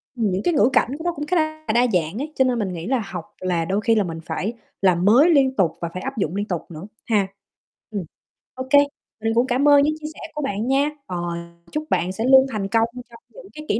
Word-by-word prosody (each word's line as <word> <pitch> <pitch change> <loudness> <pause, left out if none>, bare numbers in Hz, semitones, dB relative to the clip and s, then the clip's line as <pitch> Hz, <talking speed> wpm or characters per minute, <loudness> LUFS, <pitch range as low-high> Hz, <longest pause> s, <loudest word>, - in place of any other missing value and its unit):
ừm, 220 -5 0
những 185 +2 -1
cái 345 - +2
ngữ 245 -4 +4
cảnh 245 - +3
của 320 - -8
nó 350 - +1
cũng 295 -1 -5
khá 365 - 0
là 310 0 -1
đa 245 +1 +4
dạng 165 +3 0
ấy, 295 +4 -4
cho 265 - +3
nên 245 -2 +1
mình 190 -3 -2
nghĩ 170 +3 -6
là 255 -4 0
học 175 -3 -6 0.2
là 175 -3 0
đôi 195 +4 0
khi 225 +1 +3
là 210 - +3
mình 165 -2 -5
phải 210 +5 -3 0.3
làm 180 -1 +3
mới 260 +11 +6
liên 270 -4 +4
tục 175 -5 +2
và 170 - -2
phải 185 - -5
áp 270 -2 -5
dụng 190 -2 -1
liên 205 +1 -2
tục 175 -5 -2
nữa 165 +5 -8 0.2
ha. 205 -4 +2 0.6
Ừm, 200 -4 -3 0.5
OK, 260 0 -7 0.5
mình 225 0 +1
cũng 240 +2 +3
cảm 260 +4 +2
ơn 285 -1 +7
những 305 +1 +2
chia 305 - -6
sẻ - - -14 0.2
của 300 - -3
bạn 220 -3 -2
nha, 275 +2 +2 0.2
ờ, 180 - -5 0.5
chúc 305 0 -2
bạn 180 +2 +1
sẽ 220 +4 -4
luôn 265 +1 +7
thành 200 -3 -2
công 225 +2 +2 0.2
trong 230 - -14
những - - -13
cái 305 0 -9
kỹ 215 - +1
225 Hz, 260 wpm, -22 LUFS, 190-275 Hz, 0.6 s, ơn